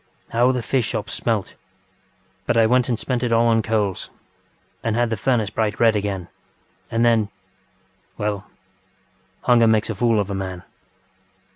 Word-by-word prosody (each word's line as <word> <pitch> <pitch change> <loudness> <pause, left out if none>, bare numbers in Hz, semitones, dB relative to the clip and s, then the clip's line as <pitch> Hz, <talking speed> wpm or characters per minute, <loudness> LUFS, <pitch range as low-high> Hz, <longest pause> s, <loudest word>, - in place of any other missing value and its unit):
How 120 +2 +3
the 125 -2 -2
fish 125 -2 0
shops 105 - -4
smelt! 110 -5 -2 0.9
But - - +2
I 115 - +5
went 125 +2 +2
and 120 - +1
spent 125 +1 -2
it 125 -2 -1
all 115 0 +4
on 115 -1 +3
coals, 105 -4 -1 0.7
and 115 -1 0
had 120 -1 +1
the - - +1
furnace 110 -2 0
bright 105 -2 -1
red 115 -2 +4
again, 100 -4 -2 0.6
and 115 -2 +2 0.9
thenŌĆöWell, 105 -2 -2 1.0
hunger 120 -2 +5
makes 110 0 +2
a - - -2
fool 115 +1 +2
of 100 0 -2
a - - -2
man. 95 -2 -5
115 Hz, 155 wpm, -22 LUFS, 105-120 Hz, 1.0 s, I